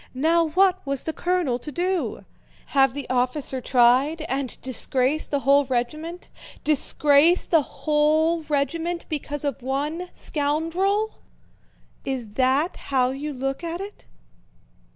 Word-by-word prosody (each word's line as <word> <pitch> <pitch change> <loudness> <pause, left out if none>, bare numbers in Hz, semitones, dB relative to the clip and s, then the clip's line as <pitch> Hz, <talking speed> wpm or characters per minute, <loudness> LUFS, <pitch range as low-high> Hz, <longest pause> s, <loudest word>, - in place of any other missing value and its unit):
Now 330 +5 +3
what 375 +3 +2
was 275 -2 -3
the 320 - -3
colonel 345 -10 0
to 300 - -7
do? 360 +4 -2 0.5
Have 270 -2 +4
the 285 - -5
officer 255 +1 -1
tried 255 +6 +3
and 275 -4 -3
disgrace 260 +3 0
the 285 -1 -1
whole 280 +1 +4
regiment? 305 +8 -3 0.4
Disgrace 300 +3 +3
the 325 -3 +3
whole 310 +3 +1
regiment 330 +4 -1
because 290 -2 -4
of 280 -4 -2
one 295 +7 -3
scoundrel? 330 +9 -1 0.8
Is 255 -5 -4
that 265 - +1
how 255 -2 +2
you 285 +3 -4
look 270 +3 -3
at 335 +1 -4
it? 400 +2 -9
295 Hz, 125 wpm, -24 LUFS, 265-330 Hz, 0.8 s, Have